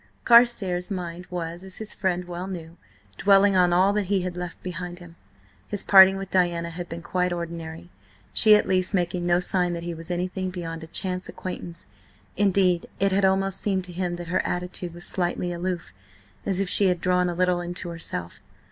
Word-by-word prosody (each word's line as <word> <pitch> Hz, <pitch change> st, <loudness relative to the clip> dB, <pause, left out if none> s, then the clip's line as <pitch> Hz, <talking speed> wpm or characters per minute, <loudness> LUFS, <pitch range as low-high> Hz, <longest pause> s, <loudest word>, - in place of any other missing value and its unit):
Carstares' 225 Hz, -7 st, +4 dB
mind 180 Hz, -2 st, -5 dB
was, 175 Hz, 0 st, -5 dB
as 190 Hz, -1 st, -7 dB
his 220 Hz, -1 st, -6 dB
friend 180 Hz, -2 st, -1 dB
well 175 Hz, +1 st, -6 dB
knew, 170 Hz, -3 st, -7 dB, 0.4 s
dwelling 200 Hz, 0 st, +5 dB
on 180 Hz, -1 st, +4 dB
all 185 Hz, +3 st, +4 dB
that 210 Hz, -1 st, 0 dB
he 195 Hz, 0 st, +1 dB
had 180 Hz, -1 st, -4 dB
left 180 Hz, -1 st, -7 dB
behind 180 Hz, -1 st, -5 dB
him. 175 Hz, -2 st, -13 dB, 0.5 s
His 205 Hz, -1 st, -2 dB
parting 190 Hz, -1 st, +8 dB
with 195 Hz, 0 st, -7 dB
Diana 170 Hz, -2 st, +1 dB
had 175 Hz, +1 st, -7 dB
been 165 Hz, 0 st, -7 dB
quite 180 Hz, +1 st, 0 dB
ordinary, 170 Hz, 0 st, -6 dB, 0.4 s
she 215 Hz, -1 st, +7 dB
at 210 Hz, -, +2 dB
least 185 Hz, +1 st, +1 dB
making 175 Hz, -1 st, -1 dB
no 175 Hz, 0 st, +4 dB
sign 180 Hz, -1 st, 0 dB
that 170 Hz, 0 st, -5 dB
he 170 Hz, 0 st, -4 dB
was 165 Hz, +1 st, -10 dB
anything 185 Hz, +1 st, -2 dB
beyond 165 Hz, -3 st, -6 dB
a -, -, -8 dB
chance 185 Hz, +2 st, -3 dB
acquaintance; 175 Hz, -2 st, -7 dB, 0.5 s
indeed, 190 Hz, -3 st, +2 dB
it 195 Hz, 0 st, +2 dB
had 195 Hz, +1 st, +3 dB
almost 195 Hz, 0 st, +1 dB
seemed 190 Hz, -3 st, 0 dB
to 180 Hz, -1 st, -8 dB
him 175 Hz, 0 st, -2 dB
that 175 Hz, -1 st, -8 dB
her 185 Hz, -, +1 dB
attitude 180 Hz, -1 st, -4 dB
was 175 Hz, -, -6 dB
slightly 175 Hz, -1 st, 0 dB
aloof, 175 Hz, -, -4 dB, 0.5 s
as 195 Hz, -2 st, +1 dB
if 195 Hz, -, 0 dB
she 195 Hz, +2 st, +3 dB
had 180 Hz, -1 st, +1 dB
drawn 180 Hz, 0 st, +2 dB
a 175 Hz, -, -3 dB
little 180 Hz, 0 st, +1 dB
into 175 Hz, 0 st, -5 dB
herself. 160 Hz, -, -4 dB
180 Hz, 195 wpm, -25 LUFS, 175-190 Hz, 0.5 s, parting